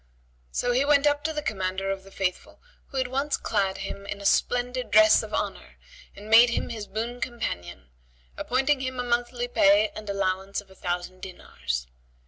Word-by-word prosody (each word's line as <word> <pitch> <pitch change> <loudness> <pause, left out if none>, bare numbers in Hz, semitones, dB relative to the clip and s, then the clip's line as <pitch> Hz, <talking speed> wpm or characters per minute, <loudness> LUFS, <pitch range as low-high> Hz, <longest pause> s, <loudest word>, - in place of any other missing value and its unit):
So 245 - 0
he 250 +3 +3
went 285 0 +4
up 290 0 +2
to 320 - +1
the 300 -1 -4
Commander 195 -4 -2
of 195 0 -4
the 195 - -14
Faithful, 190 -2 -3 0.3
who 275 - -7
at 260 -1 +1
once 275 +3 -1
clad 195 -3 0
him 200 0 -6
in 200 - -5
a 200 - -9
splendid 245 +2 +1
dress 325 +5 +6
of - - -8
honour - - -4 0.4
and 205 +1 -11
made 230 +2 +8
him 235 - -2
his 215 -3 -6
boon 235 +4 -4
companion; 90 - -5 0.4
appointing 265 +3 +1
him 260 -1 -4
a - - 0
monthly 245 0 -1
pay 210 -2 +4
and 215 -1 -8
allowance 195 0 -1
of 200 -2 -13
a - - -16
thousand 180 0 -4
dinars. - - -5
215 Hz, 185 wpm, -26 LUFS, 195-250 Hz, 0.4 s, made